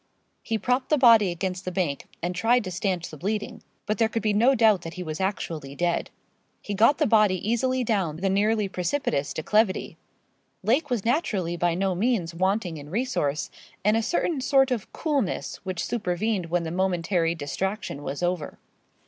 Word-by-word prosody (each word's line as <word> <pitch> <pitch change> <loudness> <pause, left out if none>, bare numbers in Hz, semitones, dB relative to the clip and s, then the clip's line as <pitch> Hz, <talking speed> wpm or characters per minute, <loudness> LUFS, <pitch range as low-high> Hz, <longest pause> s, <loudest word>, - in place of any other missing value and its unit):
He 225 - -1
propped 250 +4 0
the 305 - +4
body 230 -6 +6
against 180 +1 -3
the 185 - -4
bank, 175 -7 -2 0.2
and 175 +1 -1
tried 230 +7 +2
to 185 - -5
stanch 180 -1 -2
the 155 - -9
bleeding. 205 +6 -3 0.2
But 215 -1 -2
there 225 -1 +3
could 225 -1 -3
be 215 -1 +2
no 240 +6 +4
doubt 220 -5 +4
that 165 0 -8
he 180 - -5
was 155 +1 -5
actually 160 -7 -3
dead. 175 +2 0 0.5
He 205 - -5
got 230 +8 +4
the - - +2
body 215 -4 +4
easily 255 +3 +1
down 195 -9 0
the 185 +5 -2
nearly 210 +2 +2
precipitous 180 - -1
declivity. 210 +5 0 0.7
Lake 285 +7 +2
was 235 -5 -1
naturally 205 - 0
by 175 0 +1
no 190 +1 0
means 190 -4 0
wanting 185 -1 0
in 145 0 -10
resource, 160 - -1 0.3
and 210 +1 +4
a 225 - +2
certain 315 +3 0
sort 270 -1 +3
of 235 -5 -2
coolness, 280 - -2
which 185 -3 -4
supervened 205 -3 -1
when 170 +1 0
the 160 - -4
momentary 175 -2 0
distraction 170 +2 -3
was 145 +3 -4
over. 175 -4 -2
195 Hz, 180 wpm, -25 LUFS, 175-225 Hz, 0.7 s, body